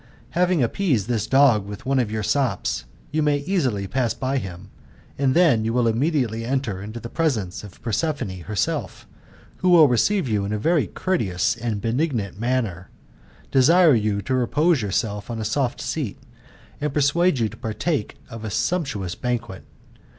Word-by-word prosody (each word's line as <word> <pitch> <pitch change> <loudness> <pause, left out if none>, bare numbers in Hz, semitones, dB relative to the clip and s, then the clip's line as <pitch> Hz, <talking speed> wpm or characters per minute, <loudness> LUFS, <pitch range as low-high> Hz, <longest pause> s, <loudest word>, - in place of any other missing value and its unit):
Having 180 -4 +2
appeased 125 - 0
this 115 -4 -1
dog 130 -7 +4
with 105 +2 -8
one 135 0 +2
of 120 -4 0
your 110 0 -3
sops, 135 +1 0 0.3
you 155 +1 +1
may 150 -1 +2
easily 140 - -1
pass 120 +3 -1
by 135 +1 -1
him, 95 -1 -9 0.4
and 135 -1 +1
then 160 -11 +4
you 115 +1 -1
will 120 -1 +2
immediately 115 -2 0
enter 120 -6 -2
into 110 +3 -7
the 115 - -7
presence 115 - -1
of 100 -3 -12
Prospefrine 115 - -2
herself, 105 -4 -2 0.5
who 185 - +1
will 165 -4 +8
receive 145 - +2
you 105 -3 0
in 100 - -3
a 105 - 0
very 160 +8 +2
courteous 110 - 0
and 115 -3 -3
benignant 115 - -1
manner, 115 -7 -1 0.6
desire 160 +5 +6
you 105 -3 0
to 130 - -2
repose 145 +5 +2
yourself 105 +1 -2
on 115 -1 -4
a 110 - -3
soft 130 +4 -1
seat, 140 -11 -3 0.6
and 150 -2 -2
persuade 150 +3 +3
you 115 -2 +1
to - - -10
partake 115 +3 -2
of 115 -1 -9
a 110 - -3
sumptuous 105 - -1
banquet. 120 -6 -4
120 Hz, 165 wpm, -23 LUFS, 105-145 Hz, 0.6 s, will